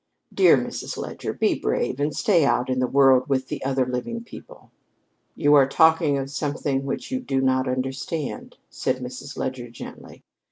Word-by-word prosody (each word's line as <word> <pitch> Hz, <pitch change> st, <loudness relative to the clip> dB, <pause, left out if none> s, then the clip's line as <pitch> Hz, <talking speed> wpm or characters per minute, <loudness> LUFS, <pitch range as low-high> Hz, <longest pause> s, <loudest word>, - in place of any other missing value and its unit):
Dear -, -, +6 dB
Mrs. -, -, -5 dB
Leger, -, -, -5 dB
be -, -, +1 dB
brave 130 Hz, -, -2 dB
and 145 Hz, +1 st, 0 dB
stay 195 Hz, -9 st, +3 dB
out 130 Hz, -2 st, +1 dB
in 130 Hz, -, 0 dB
the 130 Hz, -, +1 dB
world 135 Hz, 0 st, +4 dB
with 130 Hz, -1 st, 0 dB
the -, -, -5 dB
other 135 Hz, -1 st, +1 dB
living 130 Hz, -, -4 dB
people." -, -, -13 dB, 0.6 s
"You 145 Hz, -2 st, +3 dB
are 140 Hz, -2 st, +6 dB
talking 160 Hz, -1 st, +4 dB
of 135 Hz, 0 st, -4 dB
something 140 Hz, -2 st, -2 dB
which 135 Hz, -, -4 dB
you 260 Hz, -, -1 dB
do 135 Hz, -, -1 dB
not 130 Hz, 0 st, +1 dB
understand," 135 Hz, +4 st, -4 dB
said 130 Hz, -, -1 dB
Mrs. 125 Hz, +2 st, -8 dB
Leger 125 Hz, -2 st, -4 dB
gently. 115 Hz, -, -11 dB
135 Hz, 170 wpm, -24 LUFS, 130-150 Hz, 0.6 s, Dear